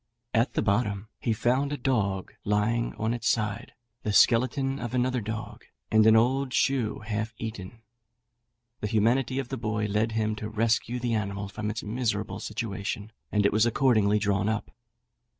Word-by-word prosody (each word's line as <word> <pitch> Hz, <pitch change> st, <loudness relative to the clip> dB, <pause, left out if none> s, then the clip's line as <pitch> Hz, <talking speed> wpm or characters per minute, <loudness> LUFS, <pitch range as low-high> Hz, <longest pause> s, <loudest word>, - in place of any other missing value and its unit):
At 115 Hz, +1 st, +2 dB
the -, -, 0 dB
bottom 100 Hz, -1 st, 0 dB
he 115 Hz, -, -1 dB
found 130 Hz, +6 st, +1 dB
a 145 Hz, -, -2 dB
dog 100 Hz, -9 st, -1 dB
lying 105 Hz, +3 st, 0 dB
on 110 Hz, +1 st, -1 dB
its 120 Hz, -, 0 dB
side, 105 Hz, -3 st, -1 dB, 0.3 s
the 105 Hz, -, -2 dB
skeleton 130 Hz, +5 st, +3 dB
of 120 Hz, +1 st, -4 dB
another 125 Hz, 0 st, +1 dB
dog, 110 Hz, +1 st, -6 dB, 0.3 s
and 110 Hz, 0 st, +5 dB
an 110 Hz, -, +7 dB
old 130 Hz, +3 st, +2 dB
shoe 125 Hz, -7 st, +1 dB
half 110 Hz, +1 st, -3 dB
eaten. 110 Hz, 0 st, -7 dB, 1.0 s
The 105 Hz, -, -2 dB
humanity 120 Hz, +5 st, +2 dB
of 135 Hz, -2 st, -2 dB
the 135 Hz, -, -3 dB
boy 110 Hz, -2 st, -1 dB
led 105 Hz, +2 st, 0 dB
him 110 Hz, -1 st, 0 dB
to 105 Hz, 0 st, -5 dB
rescue 115 Hz, +2 st, 0 dB
the 120 Hz, -1 st, -1 dB
animal 100 Hz, -2 st, -2 dB
from 105 Hz, +1 st, -4 dB
its 110 Hz, +1 st, -4 dB
miserable 105 Hz, -2 st, -2 dB
situation, 105 Hz, -2 st, -4 dB, 0.2 s
and 105 Hz, -1 st, +2 dB
it 100 Hz, -, +3 dB
was 110 Hz, +2 st, +4 dB
accordingly 110 Hz, -5 st, +3 dB
drawn 100 Hz, -1 st, +1 dB
up. 110 Hz, -1 st, -2 dB
110 Hz, 170 wpm, -27 LUFS, 105-120 Hz, 1.0 s, an